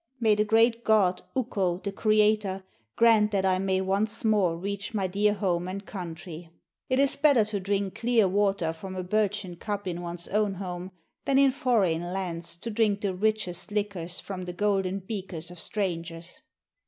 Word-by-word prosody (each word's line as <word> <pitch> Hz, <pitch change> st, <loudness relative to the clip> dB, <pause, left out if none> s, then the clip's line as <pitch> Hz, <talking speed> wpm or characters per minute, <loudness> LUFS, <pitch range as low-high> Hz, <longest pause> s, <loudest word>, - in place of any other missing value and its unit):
May 220 Hz, -3 st, +4 dB
the 210 Hz, 0 st, +2 dB
great 225 Hz, +2 st, +3 dB
god, 195 Hz, -5 st, +3 dB
Ukko, 195 Hz, -8 st, 0 dB
the 200 Hz, +2 st, -4 dB
Creator, 210 Hz, -2 st, +2 dB, 0.3 s
grant 225 Hz, -2 st, +5 dB
that 195 Hz, -2 st, 0 dB
I 185 Hz, -1 st, +2 dB
may 190 Hz, 0 st, +1 dB
once 205 Hz, +4 st, -1 dB
more 200 Hz, -6 st, +3 dB
reach 200 Hz, +4 st, -4 dB
my 195 Hz, -2 st, +1 dB
dear 205 Hz, +3 st, +1 dB
home 180 Hz, -4 st, -1 dB
and 195 Hz, +2 st, -5 dB
country. 170 Hz, -3 st, -7 dB, 0.4 s
It 260 Hz, -, +2 dB
is 275 Hz, 0 st, +3 dB
better 280 Hz, -7 st, +4 dB
to 210 Hz, -1 st, -3 dB
drink 195 Hz, 0 st, -2 dB
clear 230 Hz, -3 st, +3 dB
water 195 Hz, -4 st, +1 dB
from 190 Hz, +3 st, -8 dB
a 185 Hz, -, -3 dB
birchen 205 Hz, -2 st, -1 dB
cup 205 Hz, 0 st, -4 dB
in 175 Hz, -1 st, -3 dB
one's 170 Hz, 0 st, -2 dB
own 210 Hz, -1 st, +1 dB
home, 180 Hz, -1 st, -5 dB, 0.4 s
than 275 Hz, -, +2 dB
in 275 Hz, -1 st, +6 dB
foreign 230 Hz, -, +1 dB
lands 175 Hz, -2 st, -3 dB
to 230 Hz, -, -4 dB
drink 210 Hz, -2 st, +1 dB
the 200 Hz, -2 st, -1 dB
richest 185 Hz, -3 st, -1 dB
liquors 200 Hz, -4 st, -2 dB
from 185 Hz, -2 st, -6 dB
the 180 Hz, -, -5 dB
golden 195 Hz, 0 st, 0 dB
beakers 185 Hz, -4 st, -6 dB
of 180 Hz, -, -8 dB
strangers.' 170 Hz, -, -3 dB
195 Hz, 175 wpm, -27 LUFS, 180-215 Hz, 0.4 s, in